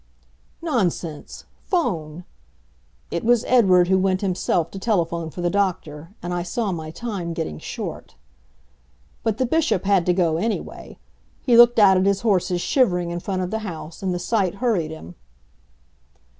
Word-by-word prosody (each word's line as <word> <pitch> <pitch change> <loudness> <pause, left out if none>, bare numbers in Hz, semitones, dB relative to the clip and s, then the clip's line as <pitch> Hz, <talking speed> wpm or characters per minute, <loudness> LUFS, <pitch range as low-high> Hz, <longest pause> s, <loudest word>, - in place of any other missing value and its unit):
"Nonsense 180 - -2 0.2
'phone." 175 - -2 0.9
It 170 - -2
was 240 0 +3
Edward 185 -8 +5
who 190 +1 +3
went 185 0 +1
himself 180 -3 0
to 195 - -7
telephone 170 -6 -1
for 175 - -7
the 175 - +1
doctor, 170 -6 -2
and 175 0 -3
I 175 - -1
saw 200 +4 -2
my 160 -3 -5
time 185 -3 -5
getting 75 - -4
short. - - -7 1.1
But 220 -2 -1
the 255 - +1
Bishop 295 - +1
had 195 -3 +2
to 180 - +4
go, 170 -3 +1
anyway. 220 +6 -4 0.5
He 245 - +4
looked 240 0 +7
out 195 -3 +6
at 185 +1 +2
his 200 -1 +1
horses 185 -5 +1
shivering 180 -10 +1
in 175 - -3
front 185 +1 -3
of 180 - -4
the 220 - -1
house, 165 -6 -8
and 190 -1 -1
the 175 - -1
sight 190 0 0
hurried 200 -8 0
him. 120 - -9
185 Hz, 160 wpm, -22 LUFS, 170-215 Hz, 1.1 s, looked